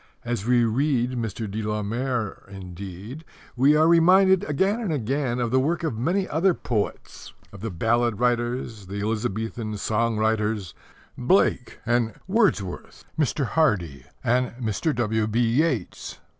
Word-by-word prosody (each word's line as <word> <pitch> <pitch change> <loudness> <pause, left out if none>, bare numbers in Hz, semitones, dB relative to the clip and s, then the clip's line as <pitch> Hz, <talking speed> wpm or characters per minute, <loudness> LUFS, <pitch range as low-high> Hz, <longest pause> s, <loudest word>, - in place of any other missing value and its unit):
As 120 -3 -3
we 120 -1 +4
read 125 +1 +1
Mr. 115 -3 -4
de 105 +2 -4
la 105 0 -2
Mare, 120 -1 -3
indeed, 95 - -8 0.3
we 135 +4 +4
are 155 +1 +4
reminded 185 +3 +5
again 190 +9 +1
and 205 -7 -2
again 130 -2 -1
of 120 -2 -1
the 130 - +4
work 160 +5 0
of 155 -8 -1
many 175 - 0
other 170 +4 +2
poets 110 -4 -4 0.2
of 100 - -10
the 115 - -3
ballad 115 +4 0
writers, 120 -3 -1
the 100 +2 -5
Elizabethan 110 0 -3
song 110 +2 0
writers, 110 -4 0 0.5
Blake 125 -2 +2
and 120 -2 +1
Wordsworth, 190 - 0
Mr. 150 -2 0
Hardy 95 - 0 0.2
and 125 0 +1
Mr. 120 +7 -1
W.B. 110 -1 0
Yeats. 120 +3 0
120 Hz, 140 wpm, -24 LUFS, 110-140 Hz, 0.5 s, reminded